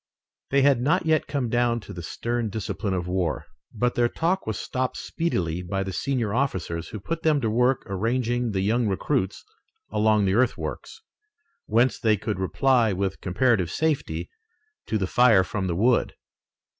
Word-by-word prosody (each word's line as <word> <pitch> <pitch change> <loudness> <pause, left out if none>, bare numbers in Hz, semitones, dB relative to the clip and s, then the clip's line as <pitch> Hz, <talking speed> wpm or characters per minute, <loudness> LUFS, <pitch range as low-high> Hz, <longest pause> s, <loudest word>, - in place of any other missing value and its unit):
They 140 0 +3
had 135 -3 +4
not 165 +7 +2
yet 155 -1 +2
come 140 -4 -1
down 120 0 +1
to 100 - -10
the 85 - -7
stern 115 +7 -2
discipline 100 -1 -3
of 90 -2 -2
war, 90 -3 -1 0.3
but 120 +2 0
their 120 -1 +2
talk 175 +3 -1
was 110 - -2
stopped 130 0 -2
speedily 90 - -2
by 95 +2 -2
the 95 -1 -5
senior 120 -3 -1
officers, 95 - -1
who 105 - -7
put 165 +11 -4
them 155 -2 +3
to 115 -5 -1
work 125 +3 +2
arranging 120 +4 -1
the 95 -2 -1
young 115 +4 +1
recruits 95 -1 -1 0.5
along 105 -1 +3
the 95 - +2
earthworks, 130 - -1 0.6
whence 120 +4 +2
they 110 -2 +3
could 105 0 -3
reply 120 +4 +2
with 95 +1 -2
comparative 95 -1 +1
safety 135 - -1 0.6
to 110 - 0
the 95 - 0
fire 115 -1 +5
from 95 +2 -3
the 85 - -1
wood. 115 +6 +2
115 Hz, 170 wpm, -25 LUFS, 95-130 Hz, 0.6 s, fire